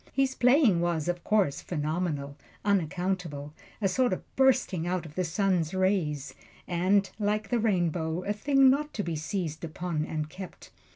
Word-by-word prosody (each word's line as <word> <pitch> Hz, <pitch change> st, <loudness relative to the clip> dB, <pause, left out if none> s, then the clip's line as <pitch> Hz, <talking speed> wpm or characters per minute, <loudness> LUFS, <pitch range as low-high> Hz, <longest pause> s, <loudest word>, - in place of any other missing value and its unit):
His 270 Hz, -1 st, +2 dB
playing 250 Hz, -, +4 dB
was, 170 Hz, -3 st, 0 dB
of 175 Hz, 0 st, -2 dB
course, 200 Hz, -10 st, +1 dB
phenomenal, 150 Hz, -3 st, -2 dB, 0.3 s
unaccountable, 180 Hz, -5 st, -1 dB, 0.3 s
a 205 Hz, -, +2 dB
sort 245 Hz, +6 st, +2 dB
of -, -, -8 dB
bursting 250 Hz, -10 st, +2 dB
out 180 Hz, -1 st, -1 dB
of 155 Hz, -, -10 dB
the 185 Hz, -, -1 dB
sun's 180 Hz, -1 st, 0 dB
rays, 180 Hz, -7 st, 0 dB, 0.3 s
and, 190 Hz, +3 st, +2 dB
like 210 Hz, 0 st, 0 dB
the 240 Hz, -, +1 dB
rainbow, 175 Hz, -5 st, 0 dB
a 205 Hz, -, -1 dB
thing 270 Hz, +4 st, +4 dB
not 300 Hz, +2 st, -1 dB
to 205 Hz, -, -1 dB
be 170 Hz, -2 st, -3 dB
seized 155 Hz, 0 st, -3 dB
upon 165 Hz, -1 st, -3 dB
and 155 Hz, -1 st, -3 dB
kept. 185 Hz, +3 st, -10 dB
180 Hz, 160 wpm, -28 LUFS, 160-205 Hz, 0.3 s, playing